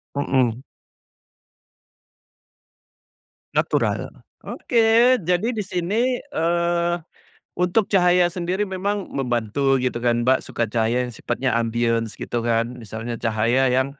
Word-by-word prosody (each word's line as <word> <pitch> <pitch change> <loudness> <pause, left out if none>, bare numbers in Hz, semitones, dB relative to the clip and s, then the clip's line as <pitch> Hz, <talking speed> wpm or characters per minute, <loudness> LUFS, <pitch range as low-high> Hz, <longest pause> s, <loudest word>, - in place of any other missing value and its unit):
Mhm. 130 -3 0 2.9
Natural, - - 0 0.4
oke 235 +1 +3
jadi 180 +5 0
di 220 - -2
sini, 205 +7 -1
eee, 170 - 0 0.6
untuk 180 +4 +1
cahaya 180 -2 +4
sendiri 180 +2 -1
memang 200 +1 -3
membantu 135 +1 0
gitu 125 -2 -1
kan 120 0 +1
Mbak, 130 +1 +3
suka 115 - -3
cahaya 120 +2 +1
yang 120 - -6
sifatnya 125 +3 -2
ambience 115 -1 -1
gitu 120 - -3
kan, 115 +1 -1
misalnya 115 +1 -6
cahaya 115 +4 +2
yang 130 +2 +1
135 Hz, 105 wpm, -22 LUFS, 120-180 Hz, 2.9 s, cahaya